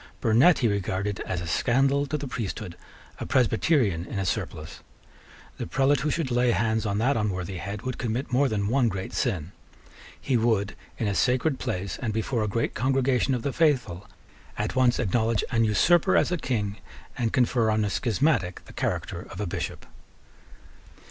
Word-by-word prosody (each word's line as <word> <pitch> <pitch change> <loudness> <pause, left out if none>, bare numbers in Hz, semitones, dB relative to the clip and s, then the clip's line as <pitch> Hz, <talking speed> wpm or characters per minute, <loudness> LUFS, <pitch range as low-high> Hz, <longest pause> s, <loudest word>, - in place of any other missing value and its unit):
Burnet 125 +10 +5
he 120 - +2
regarded 100 0 -2
as 90 -2 -2
a - - -5
scandal 135 - +2
to 150 - -2
the 145 - -5
priesthood, 110 -6 -5 0.4
a - - -4
Presbyterian 115 - +2
in - - -5
a 95 - -1
surplice. 80 -3 -4 0.8
The - - -3
prelate 135 +9 +2
who 150 +4 -1
should 155 -5 -1
lay 125 0 +3
hands 110 +1 +1
on 100 0 -1
that 125 +6 +2
unworthy 95 -4 -2
head 100 +4 -6
would 130 -1 -4
commit 120 +3 -2
more 135 +2 +3
than 100 -3 -1
one 125 +2 +2
great 95 -2 -5
sin. 95 - -1 0.7
He 130 -3 0
would, 110 -3 +1 0.2
in 110 - -1
a 100 - 0
sacred 130 +6 +1
place, 100 -6 -3
and 115 -4 -2
before 110 +1 -1
a - - -1
great 115 +3 -1
congregation 130 0 +1
of 120 - -4
the 140 - -2
faithful, 125 - +1 0.5
at 105 +4 -2
once 125 -1 +3
acknowledge 115 0 +1
an 115 -2 +3
usurper 175 - +4
as - - +2
a - - +2
King, 105 -8 -2 0.4
and 120 -3 -1
confer 125 -3 +2
on 110 0 +1
a - - -1
schismatic 115 - 0
the - - -13
character - - -3
of - - -9
a 105 - -1
Bishop. 85 - -5
115 Hz, 180 wpm, -26 LUFS, 100-130 Hz, 0.8 s, Burnet